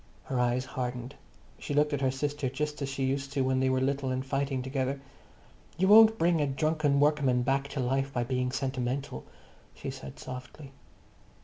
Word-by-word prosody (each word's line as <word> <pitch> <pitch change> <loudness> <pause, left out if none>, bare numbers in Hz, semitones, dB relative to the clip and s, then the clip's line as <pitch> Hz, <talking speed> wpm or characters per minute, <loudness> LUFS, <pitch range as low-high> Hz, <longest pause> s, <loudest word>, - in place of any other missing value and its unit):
Her 130 - -2
eyes 125 +1 +1
hardened. 125 0 -4 0.5
She 145 - -4
looked 150 0 +3
at 140 - -1
her 135 - +3
sister 145 0 -2
just 150 +3 -3
as 135 - -2
she 135 0 -3
used 135 +1 -2
to 140 - +1
when 130 0 +1
they 130 0 +2
were 130 0 +2
little 135 0 0
and 130 +1 -2
fighting 135 -1 -1
together. 135 +1 -2 0.8
"You 190 +2 +2
won't 220 +1 +8
bring 170 -3 +2
a 145 - +2
drunken 145 0 +1
workman 140 -4 +3
back 135 +2 +1
to 140 - -5
life 135 +2 0
by 120 -2 -1
being 125 +1 -1
sentimental," 130 - -3 0.5
she - - -5
said 65 0 -9
softly. 130 +2 -9
135 Hz, 185 wpm, -29 LUFS, 130-145 Hz, 0.8 s, won't